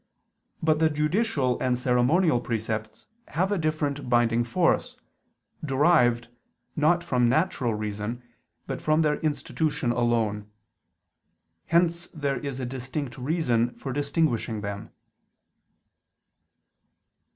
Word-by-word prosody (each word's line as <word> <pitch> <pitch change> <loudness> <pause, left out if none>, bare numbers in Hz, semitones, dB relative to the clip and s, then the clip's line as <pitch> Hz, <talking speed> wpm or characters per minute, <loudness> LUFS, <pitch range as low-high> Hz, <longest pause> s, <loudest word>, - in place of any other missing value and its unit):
But 155 -1 +3
the 160 0 +4
judicial 150 - 0
and 125 -1 +1
ceremonial 125 +4 +2
precepts 110 -2 -4 0.2
have 185 +6 -1
a 205 - +1
different 145 -4 -2
binding 120 -1 +3
force, 115 - +1 0.7
derived, 135 -5 +3 0.5
not 170 +3 +3
from 125 -5 +2
natural 130 - +1
reason, 105 +3 -4 0.4
but - - -5
from 155 +1 +2
their 150 -1 +1
institution 150 -2 -1
alone. 115 -4 0 1.2
Hence 170 0 +2
there 140 -4 -1
is 140 -3 -5
a 130 - -3
distinct 130 +2 -5
reason 125 -5 0
for 135 - -5
distinguishing 140 -6 0
them. 100 -1 -5
130 Hz, 105 wpm, -26 LUFS, 120-155 Hz, 1.2 s, the